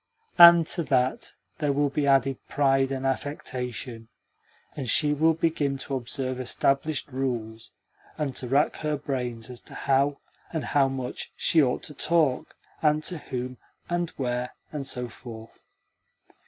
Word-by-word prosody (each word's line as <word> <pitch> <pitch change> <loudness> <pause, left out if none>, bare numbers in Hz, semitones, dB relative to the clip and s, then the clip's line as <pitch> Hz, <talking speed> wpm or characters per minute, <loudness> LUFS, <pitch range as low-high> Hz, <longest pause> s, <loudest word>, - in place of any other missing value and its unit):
And 170 -1 +10
to 170 - +1
that 130 -2 0 0.3
there 150 -2 +1
will 140 0 +1
be 145 0 0
added 135 -1 +3
pride 135 -1 +2
and 135 0 -3
affectation, 125 -4 -4 0.7
and 130 -5 -4
she 150 +6 +3
will 160 +2 +3
begin 155 -4 0
to 135 - -6
observe 130 +1 -3
established 140 +3 0
rules, 120 -4 -3 0.5
and 140 -4 -2
to 125 - -1
rack 140 +4 +2
her 150 -1 -1
brains 125 -4 -4
as 120 - -6
to - - -13
how, 140 +1 +1 0.3
and 160 -3 -3
how 140 -2 +3
much, 130 -2 -5
she 165 -2 +3
ought 125 -3 0
to 150 - -9
talk, 155 -2 +1 0.3
and 150 0 +2
to 175 -1 -4
whom, 125 -2 -5 0.3
and 175 -1 0
where, 125 -1 -2 0.2
and 145 -3 -4
so 125 -2 -3
forth. 115 -1 -11
135 Hz, 150 wpm, -26 LUFS, 125-150 Hz, 0.7 s, And